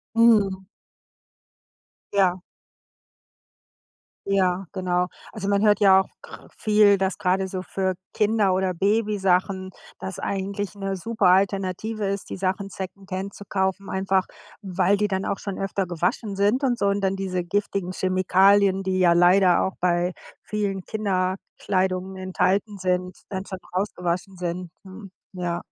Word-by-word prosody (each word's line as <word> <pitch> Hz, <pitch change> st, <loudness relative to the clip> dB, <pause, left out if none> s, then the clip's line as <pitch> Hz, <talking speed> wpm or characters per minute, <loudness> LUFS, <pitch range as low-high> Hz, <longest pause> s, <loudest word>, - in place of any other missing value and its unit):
Mhm. 205 Hz, -5 st, +4 dB, 1.5 s
Ja. 185 Hz, -2 st, +2 dB, 1.9 s
Ja, 190 Hz, -1 st, +1 dB
genau. 180 Hz, -2 st, 0 dB, 0.3 s
Also 200 Hz, -2 st, -4 dB
man 200 Hz, 0 st, +2 dB
hört 210 Hz, -1 st, +4 dB
ja 190 Hz, -1 st, +7 dB
auch 190 Hz, -, -3 dB
kr -, -, -12 dB
viel, 210 Hz, -2 st, +5 dB
dass 190 Hz, 0 st, 0 dB
grade 190 Hz, +1 st, 0 dB
so 185 Hz, -1 st, -4 dB
für 190 Hz, -1 st, -2 dB, 0.2 s
Kinder 210 Hz, -2 st, +2 dB
oder 185 Hz, -1 st, 0 dB
Babysachen 195 Hz, -2 st, +1 dB, 0.3 s
das 190 Hz, -1 st, -6 dB
eigentlich 200 Hz, +1 st, -3 dB
'ne 195 Hz, -1 st, -3 dB
super 220 Hz, +1 st, -1 dB
Alternative 195 Hz, +3 st, +1 dB
ist, 200 Hz, 0 st, -3 dB
die -, -, -5 dB
Sachen 190 Hz, +1 st, -2 dB
Secondhand 190 Hz, 0 st, -6 dB
zu 200 Hz, -, -10 dB
kaufen, 190 Hz, 0 st, -1 dB
einfach 190 Hz, 0 st, +1 dB, 0.3 s
weil 190 Hz, 0 st, +1 dB
die 210 Hz, 0 st, +1 dB
dann 190 Hz, -1 st, -2 dB
auch -, -, -2 dB
schon 200 Hz, -2 st, -5 dB
öfter 195 Hz, -1 st, -2 dB
gewaschen 180 Hz, +4 st, -2 dB
sind 205 Hz, +7 st, +2 dB
und 245 Hz, -3 st, +1 dB
so. 200 Hz, -, +1 dB
Und 200 Hz, +1 st, +1 dB
dann 195 Hz, 0 st, 0 dB
diese 185 Hz, -2 st, -2 dB
giftigen 195 Hz, 0 st, -2 dB
Chemikalien, 190 Hz, +1 st, +3 dB
die 185 Hz, -1 st, -1 dB
ja 175 Hz, -2 st, +5 dB
leider 180 Hz, +1 st, +5 dB
auch 190 Hz, -, -2 dB
bei 175 Hz, 0 st, +1 dB, 0.3 s
vielen 200 Hz, -3 st, -2 dB
Kinderkleidung 190 Hz, -1 st, -2 dB
enthalten 190 Hz, +2 st, 0 dB
sind, 180 Hz, 0 st, -1 dB
dann 190 Hz, 0 st, -4 dB
schon 190 Hz, -, -6 dB, 0.2 s
rausgewaschen 185 Hz, -1 st, -2 dB
sind, 175 Hz, 0 st, -4 dB
ne? 195 Hz, +1 st, -11 dB, 0.2 s
Ja. 175 Hz, -2 st, -3 dB
190 Hz, 140 wpm, -24 LUFS, 185-200 Hz, 1.9 s, ja